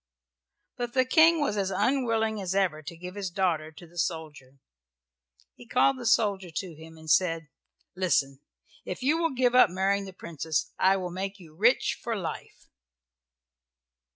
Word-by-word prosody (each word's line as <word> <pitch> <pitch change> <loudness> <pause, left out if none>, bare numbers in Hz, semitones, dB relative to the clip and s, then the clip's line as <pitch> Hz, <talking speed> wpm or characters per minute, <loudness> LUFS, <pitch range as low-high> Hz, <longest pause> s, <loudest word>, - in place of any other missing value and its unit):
But 240 -1 -4
the 260 -1 +3
King 325 +4 +5
was 210 -8 0
as 195 -1 0
unwilling 220 0 0
as 190 0 -3
ever 180 -6 +1
to 160 +2 -9
give 180 +2 -8
his 200 -2 -4
daughter 170 -4 -1
to 175 - -13
the 170 +1 -10
soldier. 150 -6 -4 1.0
He 240 - -15
called 260 +2 +2
the 240 - -3
soldier 200 -4 +2
to 170 +2 -5
him 160 +1 -13
and 160 0 -14
said, 165 -2 +2 0.5
"Listen, 140 -7 +1 0.4
if - - -6
you 300 +5 +2
will 330 -5 0
give 245 -1 +2
up 250 - +7
marrying 195 +2 0
the 190 - -8
Princess 160 -3 -3
I 190 +1 +4
will 180 -2 -4
make 195 +2 -4
you 165 -5 -16
rich 230 +9 +2
for 230 - -2
life." 180 -6 -7
190 Hz, 165 wpm, -27 LUFS, 165-230 Hz, 1.0 s, up